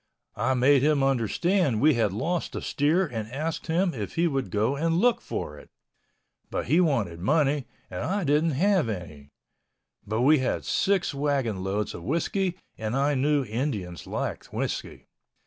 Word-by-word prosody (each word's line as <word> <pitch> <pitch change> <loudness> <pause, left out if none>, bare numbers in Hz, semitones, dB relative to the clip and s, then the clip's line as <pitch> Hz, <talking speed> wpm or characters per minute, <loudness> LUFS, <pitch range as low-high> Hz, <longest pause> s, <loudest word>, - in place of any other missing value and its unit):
I 130 - +1
made 130 +2 +4
him 145 -1 +3
understand 135 - +1
we 155 +4 +5
had 115 -5 +1
lost 165 - -2
a - - -3
steer 155 +7 +2
and 115 -7 -5
asked 155 +6 -3
him 170 +2 +1
if 105 -5 -5
he 170 - +2
would 135 -5 -1
go 110 +6 +1
and 165 +3 +1
look 240 +5 +3
for - - -5
it. - - -16 0.8
But - - -3
he 170 - +4
wanted 115 - 0
money 140 - +1 0.2
and 90 - -6
I 190 +8 -1
didn't 150 +2 +2
have 180 - +2
any... 75 -8 -7 0.8
but 110 +3 -1
we 145 +3 +5
had 130 - -1
six 195 -5 +1
wagon 135 -9 -1
loads 100 +2 -2
of - - -8
whiskey 170 - -1 0.2
and 110 +2 -2
I 140 +2 +2
knew 140 +1 +2
Indians 105 - -3
liked - - -4
whiskey. - - -4
140 Hz, 165 wpm, -26 LUFS, 110-165 Hz, 0.8 s, we